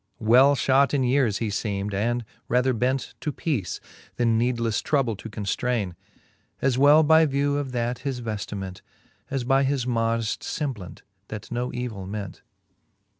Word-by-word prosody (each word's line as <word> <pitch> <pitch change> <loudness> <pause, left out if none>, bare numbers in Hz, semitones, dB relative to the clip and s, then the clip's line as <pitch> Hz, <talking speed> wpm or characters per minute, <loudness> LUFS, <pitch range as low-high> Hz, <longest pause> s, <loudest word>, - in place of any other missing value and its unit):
Well 125 +6 +5
{hot 140 +2 +3
in 135 - +2
yeares 125 -5 +2
he 110 -3 -2 0.2
{eem'd, 100 0 -3
and 120 +4 0 0.2
rather 125 +1 +2
bent 125 +3 -1
To 150 - -2
peace, 135 - -2 0.4
then 115 -2 +2
needlefTe 115 -2 0
trouble 135 -7 +1
to 110 - -8
conftraine, 105 -1 -2 0.7
As 135 -2 +1
well 145 +4 +6
by 160 +1 +5
view 140 +1 0
of 140 -2 -3
that 120 0 -1
his 130 -1 -3
veftiment, 100 -4 -5 0.5
And 135 -3 -2
by 135 0 +4
his 135 -2 0
modeft 115 -2 0
femblant, 130 - -5 0.3
that 105 -2 -8
no 120 +1 -2
evill 115 -6 -5
ment. 100 -2 -6
120 Hz, 150 wpm, -25 LUFS, 110-135 Hz, 0.7 s, well